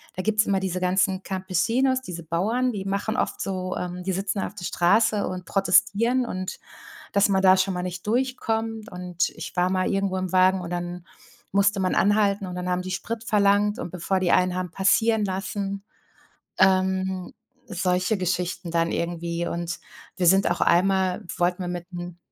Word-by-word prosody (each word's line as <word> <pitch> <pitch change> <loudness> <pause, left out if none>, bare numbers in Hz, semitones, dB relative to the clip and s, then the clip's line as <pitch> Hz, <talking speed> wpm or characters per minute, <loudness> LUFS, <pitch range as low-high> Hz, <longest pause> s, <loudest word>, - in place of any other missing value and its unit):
da 185 - -3
gibt's 215 +1 +2
immer 195 -1 +2
diese 185 -1 -2
ganzen 190 +1 +1
Campesinos, 215 +9 0
diese 175 -8 -7
Bauern, 220 +11 0
die 195 -3 -4
machen 200 +3 -1
oft - - -1
so, 185 -1 -3
ähm 180 0 -4
die 190 - -1
sitzen 195 +1 -2
auf 195 - -4
der 175 -4 -7
Straße 210 +4 +2
und 180 -1 -5
protestieren 200 +7 +2
und, 185 -4 -5 0.6
dass 200 0 +4
man 190 -1 +2
da 190 0 +6
schon 190 +1 +1
mal 180 - -3
nicht 180 +1 -6
durchkommt 225 -2 -1
und 180 -1 -2
ich - - -9
war 180 0 +2
mal 185 -1 +1
irgendwo 195 -1 0
im 185 -1 -3
Wagen 185 0 +4
und 175 - -6
dann 175 0 -5 0.5
musste 200 +1 +2
man 185 -1 0
anhalten 205 -1 +2
und 180 - -6
dann 180 0 -3
haben 180 0 0
die 185 - -5
Sprit 225 +4 -4
verlangt 205 -1 +2
und - - -5
bevor 185 +2 -1
die 180 -2 +1
einen 180 0 +3
haben 185 -1 -3
passieren 220 +3 +2
lassen, 195 +1 -3 0.8
ähm, 190 -1 +2 0.3
solche 180 +3 0
Geschichten 180 -1 -2
dann 165 0 +1
irgendwie. 170 0 -2
Und 170 0 -4 0.4
wir 180 - 0
sind 195 +1 +5
auch 175 - -1
einmal 185 +1 +2 0.2
wollten 180 +1 0
wir - - -4
mit 175 -1 -5
einem 175 -1 -7
190 Hz, 180 wpm, -25 LUFS, 180-200 Hz, 0.8 s, da